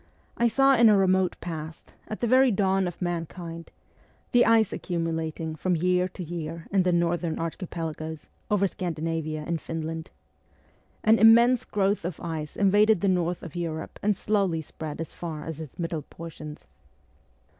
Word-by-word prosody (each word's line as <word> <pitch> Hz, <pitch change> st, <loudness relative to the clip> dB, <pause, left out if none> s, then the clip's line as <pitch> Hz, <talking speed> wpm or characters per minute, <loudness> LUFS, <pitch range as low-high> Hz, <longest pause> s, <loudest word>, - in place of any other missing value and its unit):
I 235 Hz, -, +3 dB
saw 270 Hz, +3 st, +4 dB
in 230 Hz, -2 st, +6 dB
a 210 Hz, -, +6 dB
remote 185 Hz, -1 st, +2 dB
past, 160 Hz, -2 st, -7 dB
at 215 Hz, -, -6 dB
the -, -, +2 dB
very 260 Hz, +3 st, +5 dB
dawn 195 Hz, -3 st, +2 dB
of 175 Hz, -, -6 dB
mankind, 170 Hz, -1 st, -5 dB, 0.6 s
the 245 Hz, -1 st, +5 dB
ice 225 Hz, -2 st, +4 dB
accumu 165 Hz, -2 st, -2 dB
lating 160 Hz, 0 st, -3 dB
from 185 Hz, -1 st, +1 dB
year 180 Hz, +2 st, +2 dB
to 185 Hz, 0 st, -8 dB
year 165 Hz, -1 st, -6 dB
in 195 Hz, -1 st, +4 dB
the 180 Hz, 0 st, +2 dB
northern 170 Hz, -1 st, 0 dB
archipelagoes, 160 Hz, -2 st, -5 dB, 0.2 s
over 205 Hz, -1 st, +3 dB
Scandinavia 165 Hz, -4 st, -3 dB
and 170 Hz, -1 st, -2 dB
Finland. 160 Hz, 0 st, -5 dB, 0.9 s
An 220 Hz, +1 st, +5 dB
immense 235 Hz, +3 st, +6 dB
growth 200 Hz, -1 st, 0 dB
of 175 Hz, -1 st, -4 dB
ice 160 Hz, -3 st, -5 dB
invaded 205 Hz, 0 st, +4 dB
the 200 Hz, -, +2 dB
north 175 Hz, -1 st, 0 dB
of 165 Hz, -2 st, -9 dB
Europe 165 Hz, -2 st, -4 dB
and 205 Hz, -1 st, +1 dB
slowly 195 Hz, -7 st, 0 dB
spread 155 Hz, +1 st, -7 dB
as 165 Hz, -, -5 dB
far 160 Hz, -3 st, -6 dB
as 160 Hz, -2 st, -6 dB
its 155 Hz, -4 st, -9 dB
middle 165 Hz, -2 st, -2 dB
portions. 155 Hz, 0 st, -10 dB
175 Hz, 160 wpm, -26 LUFS, 160-195 Hz, 0.9 s, in